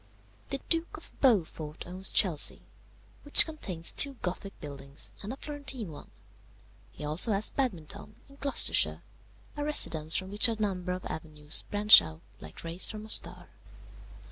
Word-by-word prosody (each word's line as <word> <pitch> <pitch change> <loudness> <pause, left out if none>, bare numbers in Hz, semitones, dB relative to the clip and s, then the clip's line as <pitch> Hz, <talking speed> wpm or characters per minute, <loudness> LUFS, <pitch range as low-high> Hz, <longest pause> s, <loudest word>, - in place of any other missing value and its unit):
"The 275 - -5
Duke 330 0 -2
of - - -14
Beaufort 165 - -2
owns 185 +2 -2
Chelsea, 170 -8 +4 0.6
which 290 - +7
contains 190 - -1
two 280 -1 +4
Gothic 185 +2 -7
buildings, 140 -1 -7
and 205 - -8
a 265 - -9
Florentine 275 - -9
one; 145 - -14 0.8
he - - -12
has 150 +8 -1
also 210 -1 0
Badminton, 205 - -6
in 275 - -20
Gloucestershire, 280 0 +2 0.5
a 290 - -6
residence 160 - +4
from 190 +1 -3
which 205 +3 +4
a 225 -2 -5
number 185 -4 -4
of 185 - -9
avenues 155 -1 -2
branch 210 +1 +6
out 80 -1 -12 0.2
like 80 0 -14
rays 170 +2 -2
from 215 -1 -10
a - - -14
star. - - -1
195 Hz, 150 wpm, -27 LUFS, 160-245 Hz, 0.8 s, which